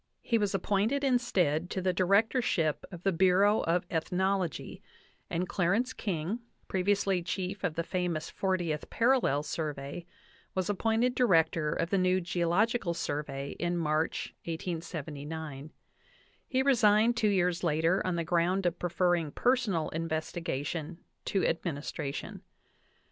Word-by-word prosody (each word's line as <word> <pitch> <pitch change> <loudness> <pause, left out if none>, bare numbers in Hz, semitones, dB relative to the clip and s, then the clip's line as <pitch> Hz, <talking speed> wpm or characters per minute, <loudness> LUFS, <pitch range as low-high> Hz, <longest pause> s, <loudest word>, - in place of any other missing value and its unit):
He 230 -2 +2
was 205 -2 0
appointed 210 +9 +1
instead 180 - +1
to 190 - -2
the 185 0 +1
director 200 +8 +3
ship 160 -9 0
of 175 -1 -9
the 195 - +3
Bureau 190 +4 +4
of 175 +2 +1
Ethnology, 185 0 -1 0.5
and 180 +2 -1
Clarence 200 +9 +1
King, 185 +2 -2 0.3
previ 190 +2 +2
ously 195 -2 0
chief 185 +3 -4
of*the 165 -2 -1
famous 175 -3 -2
Fortieth 175 -6 -2
Parallel 230 - +2
Survey, 150 +1 -4 0.5
was 185 +1 0
ap 200 - -5
pointed 230 +2 +2
Director 165 -10 +3
of 170 - -2
the 195 - +3
new 185 0 +3
Geological 175 +3 +1
Survey 140 -3 -3
in 175 0 0
March, 155 -1 -1
1879; 160 -3 -5
l - - -11 0.8
le 260 -1 +2
resigned 230 -3 +4
two 220 -2 +2
years 180 -2 +1
later 165 +3 +2
on 185 -2 -1
the 170 - -1
ground 175 +3 +1
of 175 0 0
preferring 175 -2 +1
personal 220 - +1
investigation 165 0 -3 0.3
to 195 - +1
administration. 150 -3 -3
180 Hz, 130 wpm, -30 LUFS, 160-200 Hz, 0.8 s, Bureau